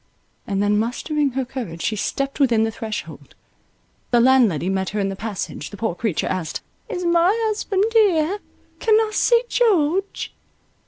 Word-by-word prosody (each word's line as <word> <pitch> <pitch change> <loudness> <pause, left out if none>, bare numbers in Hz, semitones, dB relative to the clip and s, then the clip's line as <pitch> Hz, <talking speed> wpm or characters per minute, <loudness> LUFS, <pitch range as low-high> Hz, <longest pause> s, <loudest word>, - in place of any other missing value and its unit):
and 200 -2 0
then 205 0 +2
mustering 275 +5 -1
her 265 0 -1
courage, 230 -11 -6
she 220 - 0
stepped 275 +7 -2
within 240 -5 +3
the 225 - 0
threshold. 220 -1 -7 0.7
The 240 - +4
landlady 235 - +4
met 190 0 -1
her 210 - -3
in 195 -1 0
the 195 - -4
passage; 200 -7 -5
the 205 - -10
poor 225 -2 -1
creature 185 -1 -1
asked, 180 -4 -3 0.3
"Is 360 -6 -3
my 340 +1 +4 0.2
husband 410 -2 0
here? 395 -4 +3 0.4
Can 440 -2 +3
I 440 0 +2
see 470 +3 +3
George?" 390 -6 +1
250 Hz, 160 wpm, -22 LUFS, -, 0.7 s, The